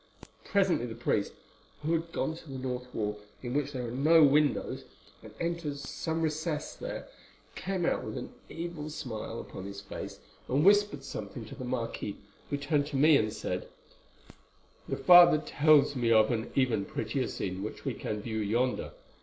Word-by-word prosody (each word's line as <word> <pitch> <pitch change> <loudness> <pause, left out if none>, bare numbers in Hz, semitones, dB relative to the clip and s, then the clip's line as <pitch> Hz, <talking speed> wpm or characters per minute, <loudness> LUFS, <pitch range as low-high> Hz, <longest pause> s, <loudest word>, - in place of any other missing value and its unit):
Presently 190 - +2
the 115 - -7
priest, 110 -3 0 0.5
who 160 +2 +1
had 165 0 -1
gone 160 - -1
to 165 -2 -13
the 135 - -5
north 125 -1 -4
wall, 105 -1 -2 0.2
in 120 -1 -3
which 145 0 0
there 125 -3 -4
are - - -5
no 155 +6 +5
windows, 145 0 +3 0.4
and - - -11
entered 170 -4 -2
some 160 +4 -3
recess 155 0 -2
there, - - -6 0.5
came 185 -2 -2
out - - +1
with - - -5
an - - -6 0.2
evil 165 -2 -5
smile 115 -6 -5
upon 95 - -8
his 100 0 -7
face, 100 - -7 0.3
and 140 +5 +2
whispered 205 -8 +4
something 110 -3 -6
to 110 - -10
the 130 -2 -6
marquis, 115 -4 -3 0.3
who 145 - -1
turned 145 0 0
to 145 - -6
me 150 +3 +6
and 110 -5 +2
said: 105 -4 -4 1.2
"'The - - -1
father 175 -2 +8
tells 150 -1 +4
me 120 -2 +1
of 110 0 +5
an 115 0 -2
even 125 -7 +2
prettier 115 +5 -2
scene 95 0 -4
which 105 - -6
we - - 0
can 105 -1 -4
view 110 -2 -3
yonder. 120 +5 0
135 Hz, 175 wpm, -30 LUFS, 115-160 Hz, 1.2 s, father